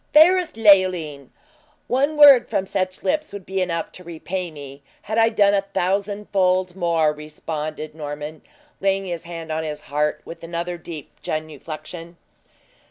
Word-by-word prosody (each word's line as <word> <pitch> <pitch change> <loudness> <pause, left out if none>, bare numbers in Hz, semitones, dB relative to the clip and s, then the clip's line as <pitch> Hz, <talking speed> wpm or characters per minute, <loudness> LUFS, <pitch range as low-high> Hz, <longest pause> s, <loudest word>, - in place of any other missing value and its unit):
"Fairest 350 +1 +6
Leoline! 185 - +4 0.6
one 280 +4 +1
word 280 -5 +8
from 190 - 0
such 185 -1 -3
lips 305 +1 0
would 200 -2 -8
be 190 0 -2
enough 170 -2 -2
to 180 - -12
repay 175 +2 -5
me, 140 -2 -10 0.2
had 220 +2 -1
I 225 0 +5
done 205 -3 +3
a 200 - +3
thousandfold 195 -1 0
more," 165 -4 +2
responded 155 0 -6
Norman, 150 0 -6 0.4
laying 195 0 +1
his 175 -3 -4
hand 165 -2 -7
on 160 +1 -1
his 150 -1 -5
heart, 150 +1 -1
with 170 - -10
another 170 +1 -4
deep 160 -3 -10
genuflection. 155 +2 -6
175 Hz, 145 wpm, -22 LUFS, 155-195 Hz, 0.6 s, word